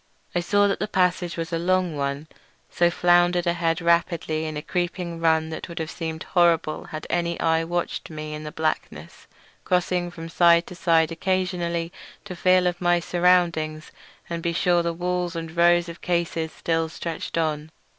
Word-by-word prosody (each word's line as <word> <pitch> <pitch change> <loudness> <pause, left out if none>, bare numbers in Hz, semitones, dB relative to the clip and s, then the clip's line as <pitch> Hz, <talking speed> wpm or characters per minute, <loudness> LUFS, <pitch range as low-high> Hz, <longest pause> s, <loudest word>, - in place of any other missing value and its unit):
I 175 - +1
saw 205 +3 +3
that 200 - -1
the - - -1
passage 180 -3 0
was 165 +1 -4
a 165 - 0
long 180 -1 +1
one, 140 +1 -3 0.4
so 175 0 +3
floundered 175 0 +3
ahead 170 -1 0
rapidly 170 -2 +1
in 155 -1 -4
a 150 - -5
creeping 175 0 -3
run 160 -1 +2
that 160 - -6
would 170 - -9
have 160 -2 -3
seemed 160 -2 -5
horrible 170 -3 +2
had 155 -5 -7
any 170 -1 -1
eye 160 0 +2
watched 175 +1 -3
me 155 -1 -6
in 150 0 -6
the 150 - -6
blackness; 155 0 -4 0.4
crossing 180 -1 0
from 165 -1 -8
side 170 0 +4
to - - -10
side 165 -2 +2
occasionally 175 -1 -1 0.3
to 185 -3 -7
feel 185 +1 +3
of 175 0 -1
my 175 0 +3
surroundings 170 -3 +1 0.4
and 170 -1 -4
be 170 0 -1
sure 175 +1 +2
the 170 0 -1
walls 180 0 -2
and 165 0 -6
rows 175 0 +4
of 170 0 -9
cases 170 -2 -1
still 165 -1 -1
stretched 165 0 -5
on. 155 -1 -1
170 Hz, 175 wpm, -24 LUFS, 160-175 Hz, 0.4 s, side